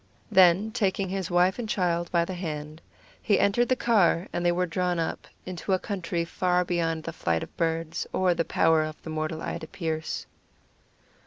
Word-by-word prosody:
Then 190 +2 +5
taking 195 -4 0
his 190 -1 -3
wife 180 +4 +3
and 225 -3 -4
child 175 -4 0
by 170 -1 +2
the 185 - -5
hand, 155 -3 -5 0.4
he 205 - +2
entered 235 +4 +2
the 255 - +4
car, 200 -7 +3
and 175 - -1
they 175 - +4
were 180 +1 +1
drawn 180 +1 -1
up 165 - -3 0.2
into 185 +1 -3
a - - +4
country 175 -4 -3
far 180 +1 +1
beyond 165 -2 -1
the 165 - -5
flight 85 - -1
of - - -11
birds, 165 -1 -1
or 185 -1 +2
the 170 - 0
power 160 -1 +3
of 155 0 -7
mortal 155 0 -3
eye - - -3
to 160 - -8
pierce. 160 -4 -3
175 Hz, 185 wpm, -27 LUFS, 165-190 Hz, 0.4 s, Then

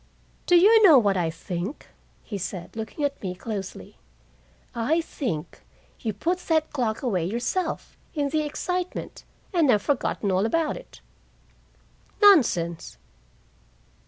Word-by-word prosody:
"Do 355 - +5
you 430 +6 +7
know 340 -9 +8
what 205 -5 +3
I 175 -3 0
think?" 175 - -6 0.4
he 205 - -6
said, 180 0 -6
looking 225 +7 -3
at 280 - -3
me 185 -2 -4
closely. 195 -1 -7 0.8
"I 240 +8 +1
think 210 - -5 0.4
you 225 - -2
put 340 - -1
that 320 -3 0
clock 240 -5 -1
away 195 -9 0
yourself, 240 - -2 0.2
in 290 -2 0
the 310 +2 +1
excitement, 360 +4 -4 0.3
and 330 -6 +3
have 210 -4 +4
forgotten 245 -7 0
all 190 +4 +2
about 325 +4 0
it." - - -13 1.2
"Nonsense." 230 - +4
245 Hz, 130 wpm, -25 LUFS, 195-320 Hz, 1.2 s, know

